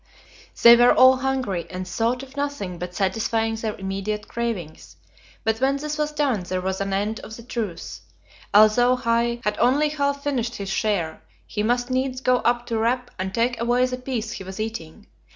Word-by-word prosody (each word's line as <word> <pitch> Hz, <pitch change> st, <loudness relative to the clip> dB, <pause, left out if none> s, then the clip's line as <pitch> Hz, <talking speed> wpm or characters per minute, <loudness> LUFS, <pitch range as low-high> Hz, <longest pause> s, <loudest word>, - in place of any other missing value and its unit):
They 235 Hz, 0 st, +11 dB
were 240 Hz, +1 st, +6 dB
all 260 Hz, 0 st, +7 dB
hungry, 255 Hz, -10 st, -2 dB
and 185 Hz, 0 st, -6 dB
thought 230 Hz, +7 st, -1 dB
of 270 Hz, 0 st, -13 dB
nothing 280 Hz, -12 st, -3 dB
but 180 Hz, 0 st, -6 dB
satisfying 225 Hz, +3 st, 0 dB
their 220 Hz, -1 st, -3 dB
immediate 195 Hz, +2 st, -4 dB
cravings; 175 Hz, -, -5 dB, 0.5 s
but 225 Hz, +1 st, 0 dB
when 270 Hz, +1 st, +2 dB
this 300 Hz, +1 st, -4 dB
was 300 Hz, 0 st, 0 dB
done 285 Hz, -8 st, 0 dB
there 185 Hz, +1 st, -3 dB
was 190 Hz, +1 st, -2 dB
an 195 Hz, 0 st, -2 dB
end 205 Hz, +3 st, -1 dB
of 220 Hz, -, -9 dB
the 235 Hz, -, -11 dB
truce. 225 Hz, -7 st, -5 dB, 0.5 s
Although 215 Hz, +4 st, +5 dB
Hai 235 Hz, -1 st, 0 dB
had 210 Hz, 0 st, -1 dB
only 275 Hz, +6 st, +3 dB
half 280 Hz, -1 st, -1 dB
finished 245 Hz, -5 st, -1 dB
his 200 Hz, -1 st, -5 dB
share, 195 Hz, -7 st, -1 dB, 0.2 s
he 210 Hz, -, -3 dB
must 245 Hz, +3 st, 0 dB
needs 255 Hz, 0 st, -1 dB
go 255 Hz, -1 st, +3 dB
up 240 Hz, 0 st, 0 dB
to 230 Hz, -2 st, -2 dB
Rap 245 Hz, +2 st, 0 dB
and 190 Hz, 0 st, -2 dB
take 235 Hz, +3 st, 0 dB
away 245 Hz, +2 st, +3 dB
the 255 Hz, 0 st, -3 dB
piece 250 Hz, -3 st, -4 dB
he -, -, -6 dB
was 190 Hz, +2 st, -8 dB
eating. 215 Hz, -3 st, -6 dB
230 Hz, 190 wpm, -23 LUFS, 200-255 Hz, 0.5 s, They